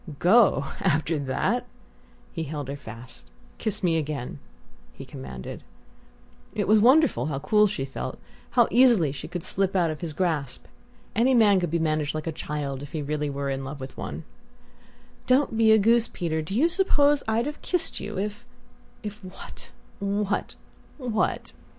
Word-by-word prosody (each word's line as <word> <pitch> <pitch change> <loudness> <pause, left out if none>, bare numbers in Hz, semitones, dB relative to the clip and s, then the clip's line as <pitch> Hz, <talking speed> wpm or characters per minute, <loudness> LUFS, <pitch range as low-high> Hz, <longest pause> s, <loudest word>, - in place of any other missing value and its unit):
"Go 190 -3 +5 0.2
after 160 -2 +1
that?" 135 -2 -1 0.7
He 165 - -3
held 145 -2 -5
her 140 - -3
fast. 115 -2 -11 0.3
"Kiss 215 -3 -2
me 165 -2 +3
again," 140 - -4 0.5
he - - -10
commanded. 65 -1 -8 0.9
It - - -1
was 215 +1 +6
wonderful 265 - +4
how 145 -3 -2
cool 210 +9 +4
she 165 -9 -3
felt 135 - -5 0.4
how 240 - +7
easily 235 - +5
she 140 - -7
could 175 -2 -5
slip 195 0 0
out 170 -3 +3
of 155 - -7
his 165 -3 -4
grasp! 155 -6 -2 0.5
Any 250 +4 +4
man 205 -4 +5
could 175 -2 -1
be 170 - +1
managed 155 -2 0
like 155 - -3
a 165 - -1
child 145 -3 -4
if 145 - -9
he 155 -2 -2
were 140 - -8
really 140 -2 -1
in 135 0 -4
love 140 +2 -6
with 130 0 -8
one.... - - -6 1.0
"Don't 255 -2 +3
be 220 0 +5
a 220 - +7
goose, 230 +2 +4
Peter; 160 -3 -2
do 155 +6 -5
you 290 +8 +4
suppose 295 -6 +3
I'd 225 +2 +1
have 295 +1 -5
kissed 360 -2 -1
you 210 - -6
if 210 +4 -3 0.3
" - - -30
"If 210 0 -7
what 185 0 -10 0.3
what 200 0 -1 0.4
what?" 240 -6 -1
175 Hz, 170 wpm, -26 LUFS, 145-220 Hz, 1.0 s, how